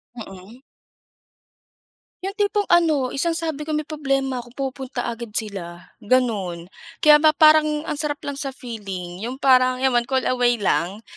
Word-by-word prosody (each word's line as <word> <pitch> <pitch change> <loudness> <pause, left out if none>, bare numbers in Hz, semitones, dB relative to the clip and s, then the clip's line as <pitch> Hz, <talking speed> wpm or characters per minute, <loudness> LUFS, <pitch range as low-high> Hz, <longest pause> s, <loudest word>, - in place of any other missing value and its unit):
Mm. 210 +2 -11 1.6
'Yong 395 +2 -5
tipong 410 0 +1
ano, 310 -7 +3
isang 330 +4 -1
sabi 315 -2 -4
ko 310 - -1
may 305 - -1
problema 275 -4 -2
'ko 240 - -10 0.2
pupunta 260 -2 -6
agad 230 -2 -9
sila, 180 -5 -5
gano'n. 200 -8 -1 0.3
Kaya 300 -1 +8
ba 310 0 +4
parang 305 -1 +5
ang 300 -2 -4
sarap 290 -1 -3
lang 280 -1 -5
sa 275 -2 -5
feeling, 195 -8 -7
'yong 240 +5 -5
parang 255 -1 +4
'yan 265 - +3
one 240 -1 +1
call 265 -1 0
away 245 -1 +2
lang. 200 -1 -1
260 Hz, 155 wpm, -22 LUFS, 220-300 Hz, 1.6 s, Kaya